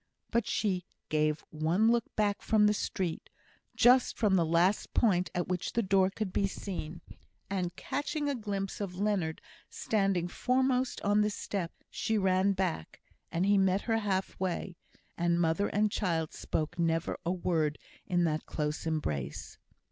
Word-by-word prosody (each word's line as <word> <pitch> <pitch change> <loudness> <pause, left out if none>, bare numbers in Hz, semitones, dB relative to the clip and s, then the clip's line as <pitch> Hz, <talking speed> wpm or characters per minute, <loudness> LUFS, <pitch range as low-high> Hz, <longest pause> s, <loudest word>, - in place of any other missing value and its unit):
But 235 -1 +1
she 190 -6 0 0.3
gave 155 0 +1
one 170 +9 +2
look 235 -1 +2
back 205 -1 +1
from 215 -1 +3
the 210 - +4
street, 185 -4 -3 0.5
just 250 +1 +5
from 210 -4 +3
the 175 - +4
last 175 +5 +2
point 185 -6 +3
at 175 - -1
which 180 -1 -2
the 235 - +1
door 190 -1 +3
could 195 -1 -4
be 195 - +2
seen, 175 -4 -6 0.5
and 180 -3 -2
catching 290 +1 -2
a 285 - +1
glimpse 205 -5 -4
of 190 -3 -4
Leonard 195 -6 0 0.3
standing 195 -5 0
foremost 255 +5 +1
on 205 +1 +3
the 210 - +2
step, 195 -4 -3 0.2
she 220 -1 0
ran 190 0 +3
back, 185 - -3 0.3
and 170 +3 +1
he 200 0 +4
met 190 +1 +3
her 225 -1 0
half 195 -3 -2
way, 185 -1 -2 0.4
and 170 0 +2
mother 165 +4 +2
and 210 0 +1
child 165 -6 -1
spoke 160 +3 -3
never 165 0 0
a 175 - 0
word 165 -4 0 0.3
in 175 -1 +2
that 155 -2 -1
close 150 +1 -2
embrace. 75 - -3
190 Hz, 160 wpm, -31 LUFS, 170-210 Hz, 0.5 s, just